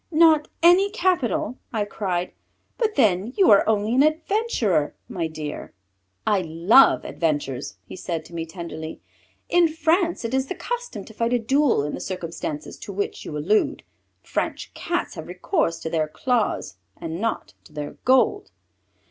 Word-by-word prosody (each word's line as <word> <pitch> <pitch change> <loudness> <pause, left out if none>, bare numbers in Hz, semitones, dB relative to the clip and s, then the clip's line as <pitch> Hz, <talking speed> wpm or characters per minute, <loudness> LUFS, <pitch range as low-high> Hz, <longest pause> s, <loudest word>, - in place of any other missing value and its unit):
"Not 315 -2 +5 0.2
any 360 +4 +6
capital," 335 - 0
I 215 -4 -1
cried, 185 -3 -2 0.5
"but 440 -3 +1
then 215 -1 +2
you 390 - +6
are 200 - +7
only 215 +1 +1
an 260 - +4
adventurer, 310 - +1
my 170 -3 -2
dear!" 155 -6 -7 0.5
"I 205 -3 +3
love 175 +10 +5
adventures," 145 -5 -2
he - - -9
said 170 -3 -4
to - - -15
me 165 -1 -4
tenderly. 160 -2 -7 0.5
"In 350 -1 +4
France 325 0 +1
it 230 - -3
is 265 0 +1
the 375 - -4
custom - - -5
to 220 - -13
fight 230 +2 0
a - - +4
duel 265 - +2
in 150 - -3
the - - -4
circumstances 165 -4 -5
to - - -7
which 200 +1 -3
you 150 - -5
allude. 190 +9 +1 0.4
French - - -3
Cats - - -2
have - - -8
recourse 310 - -1
to 160 - -3
their 155 -2 +1
claws 215 - -1 0.2
and 165 +2 -5
not 230 0 -2
to - - -17
their 150 -1 -5
gold." 265 +11 +3
215 Hz, 160 wpm, -24 LUFS, -, 0.5 s, are